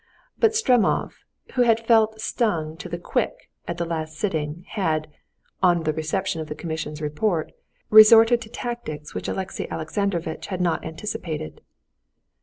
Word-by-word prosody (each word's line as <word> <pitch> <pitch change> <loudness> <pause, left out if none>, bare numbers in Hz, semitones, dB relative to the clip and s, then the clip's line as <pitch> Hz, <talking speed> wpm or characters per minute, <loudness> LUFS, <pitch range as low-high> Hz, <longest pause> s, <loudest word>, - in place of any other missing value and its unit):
But 445 -1 +3
Stremov, 250 - +2 0.4
who 255 - +2
had 230 -1 +3
felt 220 -1 +4
stung 170 -10 -1
to 180 - -8
the 175 - -3
quick 175 - -3 0.2
at 170 - -3
the 170 - -1
last 160 -1 -4
sitting, 160 -2 -2
had, 155 -7 -1 0.5
on 175 -3 +4
the 155 -1 0
reception 160 +2 -2
of 155 - -6
the 150 - -5
commission's 155 -2 -5
report, 155 +3 -1 0.4
resorted 225 +2 +8
to 220 - -9
tactics 235 -11 -6
which - - -4
Alexey 190 -1 -4
Alexandrovitch 170 0 -2
had 185 -2 -4
not 175 -2 0
anticipated. 160 - -5
175 Hz, 145 wpm, -24 LUFS, 155-220 Hz, 0.5 s, resorted